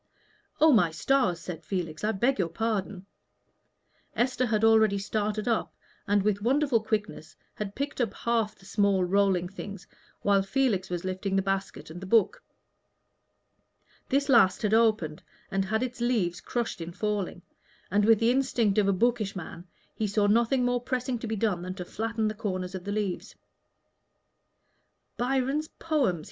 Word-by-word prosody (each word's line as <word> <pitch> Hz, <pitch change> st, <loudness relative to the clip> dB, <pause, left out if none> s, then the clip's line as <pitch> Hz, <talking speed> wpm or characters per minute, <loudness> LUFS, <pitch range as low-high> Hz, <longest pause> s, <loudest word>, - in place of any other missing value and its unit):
"Oh, 315 Hz, +1 st, +6 dB
my 210 Hz, -, +4 dB
stars!" 185 Hz, -, +1 dB
said 170 Hz, -1 st, -7 dB
Felix, 165 Hz, -4 st, -4 dB
"I 215 Hz, -, +2 dB
beg 235 Hz, +4 st, +1 dB
your 175 Hz, -3 st, +1 dB
pardon." 200 Hz, -1 st, -2 dB, 1.1 s
Esther 255 Hz, +1 st, +1 dB
had 215 Hz, -1 st, 0 dB
already 220 Hz, -2 st, +5 dB
started 210 Hz, +2 st, -2 dB
up, 230 Hz, -2 st, 0 dB, 0.3 s
and 205 Hz, -1 st, +2 dB
with 205 Hz, -1 st, 0 dB
wonderful 260 Hz, 0 st, +2 dB
quickness 210 Hz, -7 st, -3 dB, 0.2 s
had 205 Hz, -1 st, -6 dB
picked 280 Hz, -1 st, -3 dB
up 230 Hz, -5 st, 0 dB
half 230 Hz, -3 st, 0 dB
the 195 Hz, -, -20 dB
small 200 Hz, -2 st, +2 dB
rolling 190 Hz, -1 st, +2 dB
things 195 Hz, 0 st, -8 dB, 0.4 s
while 200 Hz, -1 st, +4 dB
Felix 195 Hz, -3 st, 0 dB
was 175 Hz, 0 st, -4 dB
lifting 190 Hz, +1 st, -2 dB
the 195 Hz, -, +2 dB
basket 195 Hz, -4 st, -3 dB
and 175 Hz, +3 st, -9 dB
the 190 Hz, -, -7 dB
book. 220 Hz, -1 st, +3 dB, 1.7 s
This 280 Hz, +1 st, +1 dB
last 225 Hz, -9 st, +4 dB
had 210 Hz, 0 st, +1 dB
opened, 215 Hz, -9 st, +2 dB, 0.3 s
and 195 Hz, 0 st, 0 dB
had 220 Hz, +4 st, 0 dB
its 245 Hz, -1 st, -5 dB
leaves 210 Hz, -8 st, 0 dB
crushed 235 Hz, -6 st, -3 dB
in 165 Hz, +1 st, -5 dB
falling; 200 Hz, -3 st, -3 dB, 0.5 s
and, 205 Hz, +2 st, +3 dB
with 225 Hz, +1 st, +6 dB
the 230 Hz, +1 st, +3 dB
instinct 240 Hz, -6 st, +2 dB
of 200 Hz, -, +2 dB
a 200 Hz, -, +3 dB
bookish 220 Hz, 0 st, 0 dB
man, 175 Hz, 0 st, -8 dB, 0.3 s
he 215 Hz, -, -2 dB
saw 205 Hz, +1 st, +1 dB
nothing 235 Hz, +4 st, +3 dB
more 245 Hz, 0 st, +1 dB
pressing 255 Hz, -1 st, -2 dB
to 230 Hz, -, -5 dB
be 220 Hz, -, -2 dB
done 200 Hz, -4 st, 0 dB
than 185 Hz, +1 st, -5 dB
to 180 Hz, -2 st, -6 dB
flatten 225 Hz, +2 st, -2 dB
the 215 Hz, -, -1 dB
corners 185 Hz, -4 st, -4 dB
of 185 Hz, -1 st, -6 dB
the 205 Hz, -, -3 dB
leaves. 205 Hz, -3 st, -3 dB, 1.8 s
"Byron's 270 Hz, +4 st, 0 dB
Poems!" 285 Hz, -, 0 dB
210 Hz, 165 wpm, -28 LUFS, 190-235 Hz, 1.8 s, Oh